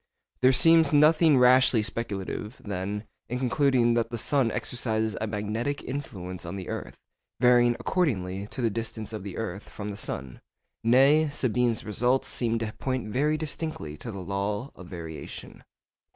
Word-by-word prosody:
There 130 +1 +6
seems 165 +2 +5
nothing 155 0 +5
rashly 125 -2 +5
speculative, 105 0 -4
then, 100 +1 -3 0.3
in 125 - -2
concluding 125 -2 +2
that 115 -1 0
the 120 - -4
sun 130 +2 +2
exercises 110 -2 -1
a 110 - -1
magnetic 110 +6 -3
influence 95 -10 -6
on 85 +2 -6
the 95 -2 -6
earth, - - -6 0.4
varying 120 -1 +5
according 100 - -1
to 130 - -6
the 115 - +2
distance 110 0 -4
of 110 - -4
the 95 -1 -7
earth 105 -3 -5
from 105 0 -6
the 100 - -7
sun. 65 -9 -5 0.4
Nay, 135 +6 +5
Sabine's 125 -4 0
results 125 +5 +1
seem 115 -2 +1
to 110 -1 -3
point 130 -4 -2
very 150 +7 +1
distinctly 155 - -4
to 115 - -7
the 100 -3 -7
law 100 +6 -3
of 90 - -11
variation. 80 -3 -8
115 Hz, 155 wpm, -27 LUFS, 105-130 Hz, 0.4 s, There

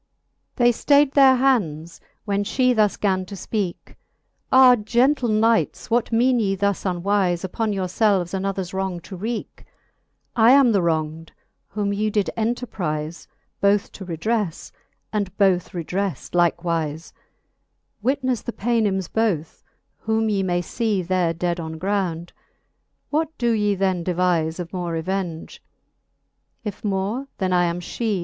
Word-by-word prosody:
XL 245 - +1
They 240 - +6
ftayd 285 +3 +3
their 270 -2 +6
hands, 180 - 0 0.2
'when 200 -1 0
fhe 250 +4 +2
thus 210 -2 +2
gan 190 -2 0
to 200 - -7
fpeake; 195 -1 -4 0.6
Ah 260 -1 +8
gentle 245 +4 +1
knights, 225 +1 +1
what 240 0 +1
meane 245 +2 +3
ye 195 -3 +1
thus 200 0 -1
unwife 185 -1 0
Upon 215 +4 -2
your 195 -2 -1
felves 185 -1 +1
anothers 190 -1 -3
wrong 190 -2 -2
to 190 +3 -9
wreake? 220 +5 -5 0.7
I 235 +1 +6
am 270 -3 +6
the 200 -3 +2
wrong'd, 160 -1 -2 0.3
whom 200 -1 -2
ye 210 +1 0
did 205 -1 0
enterprife 185 -9 -3 0.3
Both 200 0 +2
to 195 - -9
redreffe, 185 +2 -2 0.4
and 200 -3 -2
both 190 -3 +2
redreft 180 -1 -3
likewife: 170 -2 0 0.9
With 265 +5 0
the 250 -2 -1
Paynims 210 -5 0
both, 200 -9 -1 0.4
whom 220 0 0
ye 200 -2 +1
may 175 -2 0
fee 215 -2 -1
There 180 -1 +1
dead 175 +1 -2
on 160 -1 -5
ground. 180 -2 -2 0.8
What 315 +1 -1
do 240 -1 +1
ye 210 -2 +1
then 190 -2 0
devife 175 -2 0
Of 175 +1 -6
more 175 -2 -3
revenge? 170 0 -4 1.0
If 210 -3 -6
more, 205 +6 -2
then 185 -2 0
I 175 0 +3
am 170 0 -2
fhee. 210 +3 -2
195 Hz, 140 wpm, -22 LUFS, 175-225 Hz, 1.0 s, Ah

